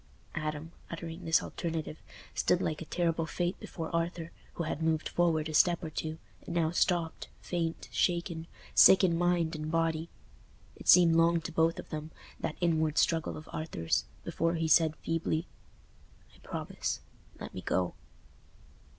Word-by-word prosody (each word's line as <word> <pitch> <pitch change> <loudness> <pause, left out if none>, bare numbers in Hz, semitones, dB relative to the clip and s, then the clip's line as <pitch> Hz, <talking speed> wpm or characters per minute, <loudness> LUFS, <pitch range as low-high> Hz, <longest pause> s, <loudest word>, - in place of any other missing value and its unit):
Adam, 155 +1 -4 0.2
uttering 170 +1 -7
this 165 0 +3
alternative, 160 -2 -4 0.3
stood 180 - +2
like 155 -4 -2
a - - -5
terrible 165 -1 0
fate 175 +2 -2
before 165 -1 -5
Arthur, 170 0 -2 0.2
who 170 - -3
had 155 0 -3
moved 160 -1 +1
forward 165 -3 +1
a 155 - -5
step 175 +3 +4
or 160 - -4
two, 155 +1 -4 0.3
and 170 - -6
now 165 -2 +2
stopped, 170 -2 0
faint, 165 -2 -3
shaken, 170 -2 0 0.3
sick 190 - +8
in 175 -3 +4
mind 175 -1 +1
and 155 0 -4
body. 165 0 0 0.7
It - - -12
seemed 170 -2 +7
long 165 +1 +4
to 165 - -6
both 165 +1 +2
of - - -8
them—that 155 0 -6
inward 160 -3 +1
struggle 165 -1 +2
of 155 - -10
Arthur's—before 160 - -2
he 165 -1 0
said, 160 -1 +5
feebly, 165 +1 -1 0.9
"I - - -21
promise; - - -4 0.4
let - - -7
me - - -5
go." 90 -1 0
165 Hz, 150 wpm, -31 LUFS, 160-170 Hz, 0.9 s, sick